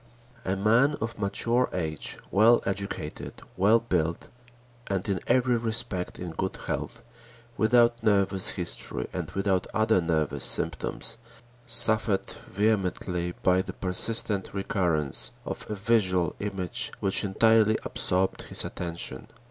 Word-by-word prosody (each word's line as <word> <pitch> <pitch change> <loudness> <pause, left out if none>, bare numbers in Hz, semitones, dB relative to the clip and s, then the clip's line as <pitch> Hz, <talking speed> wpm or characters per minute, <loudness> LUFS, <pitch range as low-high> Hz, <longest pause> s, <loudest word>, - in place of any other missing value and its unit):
A 95 - -1
man 115 +9 +3
of 115 -1 -5
mature 115 +5 +1
age, 80 -4 -3
well 110 +5 +4
educated, 100 0 -5 0.2
well 105 +5 +4
built 85 -7 -2 0.6
and 95 -2 -3
in 95 -3 -1
every 125 0 +2
respect 110 -5 -2
in 90 -1 -6
good 80 - -4
health, - - -5 0.5
without 120 +1 +3
nervous 100 -2 +1
history 85 -8 -5
and - - -4
without 95 -2 -1
other 110 -3 +2
nervous 80 -5 -1
symptoms, - - 0 0.5
suffered 110 -3 +6 0.2
vehemently 90 -4 -1
by 90 0 +3
the - - -7
persistent 100 +2 +1
recurrence 85 -7 +1
of - - -7
a 105 - -3
visual 95 -5 +1
image 95 -4 -2
which 95 - +1
entirely 110 +2 +3
absorbed 95 +1 0
his - - +1
attention. 85 -1 -6
100 Hz, 120 wpm, -26 LUFS, 90-110 Hz, 0.6 s, suffered